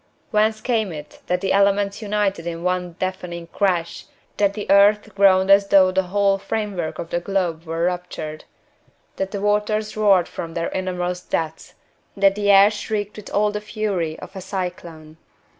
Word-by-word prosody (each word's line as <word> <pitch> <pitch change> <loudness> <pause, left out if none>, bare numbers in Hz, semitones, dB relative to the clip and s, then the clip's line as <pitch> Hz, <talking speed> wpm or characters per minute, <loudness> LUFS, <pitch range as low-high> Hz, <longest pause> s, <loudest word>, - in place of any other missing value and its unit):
Whence 215 0 +2
came 220 -6 0
it 150 -2 -10
that 180 0 0
the 195 - 0
elements 200 +1 +2
united 200 -5 -1
in 170 0 -5
one 180 -1 -1
deafening 180 -2 -4
crash; 175 -2 -1 0.3
that 200 -1 +2
the 210 - -4
earth 205 +2 +4
groaned 195 -1 +4
as 200 0 +6
though 190 -2 +5
the 190 +1 +2
whole 200 0 +2
framework 195 -5 -3
of 165 - -7
the 175 - 0
globe 175 -3 -2
were 165 +1 -3
ruptured; 175 -3 -4 0.7
that 190 0 -2
the 200 -1 -5
waters 210 +1 0
roared 200 -5 +4
from 165 -1 -7
their 170 0 -1
innermost 180 -1 -3
depths; 160 0 -3 0.4
that 195 0 +4
the 205 0 -1
air 200 +1 +7
shrieked 210 -1 -4
with 210 - -10
all 210 +1 +1
the 210 0 -4
fury 205 -7 -3
of - - -11
a 190 - -6
cyclone? 170 -5 -6
195 Hz, 170 wpm, -21 LUFS, 175-205 Hz, 0.7 s, air